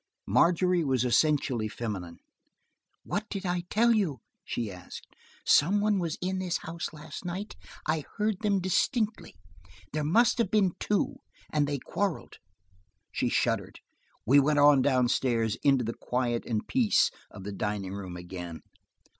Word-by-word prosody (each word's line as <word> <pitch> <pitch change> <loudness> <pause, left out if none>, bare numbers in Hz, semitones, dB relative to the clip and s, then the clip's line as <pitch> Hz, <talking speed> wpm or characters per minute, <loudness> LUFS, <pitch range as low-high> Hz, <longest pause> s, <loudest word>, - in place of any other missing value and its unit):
Margery 180 0 +3
was 130 -4 +1
essentially 125 -3 +2
feminine. 100 -7 -5 0.9
"What 210 +1 -3
did 195 -1 -5
I 175 -1 -1
tell 235 +2 +4
you?" 170 - 0 0.2
she 115 -4 -3
asked. 90 -1 -10 0.4
"Some 190 +8 +4
one 205 -1 +2
was 165 -3 -2
in 190 +1 -1
this 180 -2 -1
house 165 +1 -5
last 155 +1 -9
night; 185 +4 -5 0.3
I 155 -1 0
heard 210 -2 0
them 205 -2 +2
distinctly 210 - 0 0.6
There 155 0 -1
must 230 - +3
have 225 -5 +2
been 200 -4 +3
two, 205 -2 0 0.4
and 150 -2 +2
they 145 0 -1
quarreled–" 195 +6 -3 0.7
she - - 0
shuddered. - - 0 0.5
We 140 +4 +6
went 150 +2 +2
on 145 -1 +6
down 130 -2 +3
stairs 115 -3 +1
into 135 -3 +3
the 115 - -2
quiet 120 -1 -2
and 110 -3 -2
peace 240 -5 +3 0.2
of 100 - -11
the 105 - -5
dining 100 -1 -3
room 95 -3 -6
again. 90 -2 -7
150 Hz, 150 wpm, -28 LUFS, 115-190 Hz, 0.9 s, We